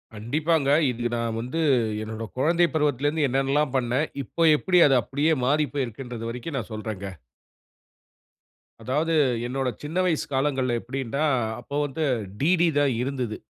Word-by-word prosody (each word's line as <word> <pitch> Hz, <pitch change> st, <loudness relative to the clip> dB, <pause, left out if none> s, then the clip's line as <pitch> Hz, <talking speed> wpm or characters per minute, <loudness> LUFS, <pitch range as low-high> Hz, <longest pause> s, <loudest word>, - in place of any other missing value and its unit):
கண்டிப்பாங்க. 145 Hz, +7 st, 0 dB, 0.2 s
இது 120 Hz, 0 st, -2 dB
நான் 115 Hz, -1 st, -2 dB
வந்து 130 Hz, +8 st, -3 dB, 0.4 s
என்னுடைய 110 Hz, 0 st, -5 dB
குழந்தை 170 Hz, +5 st, +3 dB
பருவத்துலேருந்து 145 Hz, 0 st, +1 dB
என்னன்னல்லாம் 135 Hz, +2 st, +1 dB
பண்னேன். 130 Hz, +5 st, 0 dB, 0.2 s
இப்போ 165 Hz, -, -2 dB
எப்படி 180 Hz, +3 st, +2 dB
அது 135 Hz, -, +4 dB
அப்படியே 145 Hz, +4 st, +1 dB
மாறி 150 Hz, +3 st, +2 dB
போயிருகுன்றது 120 Hz, -3 st, -4 dB
வரைக்கும் 125 Hz, +5 st, -5 dB
நான் 110 Hz, -, -8 dB
சொல்றேங்க. 100 Hz, -4 st, -6 dB, 1.6 s
அதாவது 155 Hz, +6 st, 0 dB, 0.3 s
என்னோட 135 Hz, +1 st, -2 dB, 0.2 s
சின்ன 155 Hz, +4 st, -4 dB
வயசு 165 Hz, -4 st, 0 dB
காலங்கள்ல 130 Hz, -2 st, +1 dB
எப்படின்டா 135 Hz, +3 st, -3 dB, 0.4 s
அப்போ 140 Hz, -, -8 dB
வந்து 145 Hz, +3 st, -3 dB, 0.4 s
DD 175 Hz, +3 st, +3 dB, 0.2 s
தான் 140 Hz, -3 st, +2 dB
இருந்தது. 125 Hz, -4 st, -3 dB
135 Hz, 130 wpm, -25 LUFS, 120-150 Hz, 1.6 s, அது